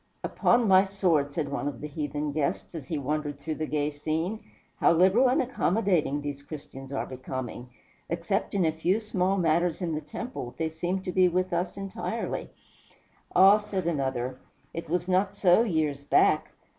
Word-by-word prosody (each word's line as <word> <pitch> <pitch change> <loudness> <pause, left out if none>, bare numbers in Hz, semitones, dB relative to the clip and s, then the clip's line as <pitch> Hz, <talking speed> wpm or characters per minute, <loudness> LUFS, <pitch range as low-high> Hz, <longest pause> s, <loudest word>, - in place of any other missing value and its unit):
"Upon 235 -1 +2
my 190 -1 +7
sword," 180 -7 +1
said 145 -1 -2
one 145 0 -2
of 145 - -4
the - - -6
heathen 150 0 -3
guests, 145 +3 -2
as 155 -6 -7
he 160 - -2
wandered 145 +1 -2
through 155 +2 -3
the 155 0 -3
gay 150 0 0
scene, 160 +8 -2 0.4
"how - - +4
liberal 190 +9 +5
and 265 +5 +2
accommodating 190 - +1
these 145 -1 -5
Christians 140 -2 -9
are 135 - -2
becoming! 130 -1 -6 0.4
Except 175 +5 -1
in 190 -3 +3
a 160 - +3
few 175 +6 +1
small 195 -3 0
matters 170 0 +2
in 175 -4 -2
the 155 - -2
temple, 150 - -6
they 160 -1 -1
seem 175 +4 -2
to 185 - -3
be 185 0 +4
with 185 +1 0
us 175 +2 -1
entirely." 195 -1 -4 0.9
"Ah," 195 +3 +8
said 195 -4 -4
another, 130 -5 -1 0.3
"it 165 -1 -6
was 175 +1 0
not 190 +1 +1
so 180 +2 +5
years 155 -9 0
back. 140 - +3
165 Hz, 175 wpm, -27 LUFS, 145-190 Hz, 0.9 s, Ah